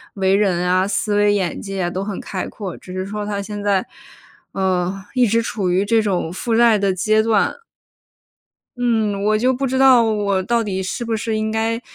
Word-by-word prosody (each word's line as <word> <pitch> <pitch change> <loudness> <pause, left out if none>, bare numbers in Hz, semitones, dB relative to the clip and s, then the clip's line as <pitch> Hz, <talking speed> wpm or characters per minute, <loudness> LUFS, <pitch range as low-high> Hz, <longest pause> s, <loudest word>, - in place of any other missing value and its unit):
为 190 -1 +1
人 180 -4 +1
啊、 185 +1 +2
思 205 +1 -1
维 205 0 +4
眼 190 -4 -2
界 190 -3 -3
都 185 - -3
很 200 -2 -5
开 190 -3 -5
阔， 195 -5 -7
只 185 - -11
是 185 0 -3
说 210 +1 -5
他 200 -1 -3
现 205 0 -6
在， 200 +1 +1 0.7
呃， 190 0 -1
一 250 -3 +3
直 230 +2 +2
处 195 -5 -2
于 185 +3 +2
这 225 +1 +3
种 185 -5 -1
负 225 +5 -2
债 230 -3 +5
的 195 -1 +1
阶 215 +4 +2
段。 220 -2 +1 1.2
嗯， 220 -4 0
我 215 +1 +2
就 250 +4 +2
不 270 +2 -2
知 260 +1 -1
道 260 -3 +6
我 205 -3 0
到 235 +2 +1
底 190 -2 -3
是 235 +6 -4
不 225 -1 -2
是 220 0 -2
应 215 0 -1
该 225 +2 -1
205 Hz, 215 characters per minute, -20 LUFS, 190-225 Hz, 1.2 s, 道